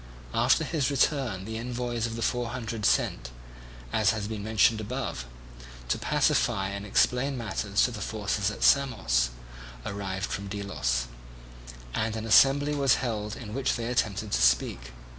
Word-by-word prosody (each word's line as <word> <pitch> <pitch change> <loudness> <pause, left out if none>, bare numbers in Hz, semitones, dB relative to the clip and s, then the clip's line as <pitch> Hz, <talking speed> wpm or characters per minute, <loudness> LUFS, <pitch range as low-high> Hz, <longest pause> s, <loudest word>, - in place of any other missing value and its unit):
After 125 +7 +3
his 150 -4 0
return 135 - 0
the 110 +1 -5
envoys 120 -1 -2
of 115 - -6
the 115 - -3
Four 120 -1 0
Hundred 115 -3 -2
sent, 60 - +1 0.6
as 110 -2 +3
has 105 -2 -1
been 105 -2 -5
mentioned 110 +1 +3
above, 110 - -4 0.6
to - - 0
pacify 95 0 +1
and 100 +1 -6
explain 125 +6 +2
matters 105 -3 0
to 125 - +2
the 110 -3 -7
forces 105 -1 -1
at 105 - -5
Samos, 110 - +3 0.6
arrived 95 -1 -4
from 100 0 -4
Delos; 95 -12 -2 0.9
and 110 - -1
an 110 0 -4
assembly 140 +6 +5
was 140 -3 +3
held 110 -4 -3
in 110 -5 -8
which 135 +1 0
they 115 - -3
attempted 110 -3 -1
to - - +1
speak. - - +2
110 Hz, 155 wpm, -27 LUFS, 100-125 Hz, 0.9 s, assembly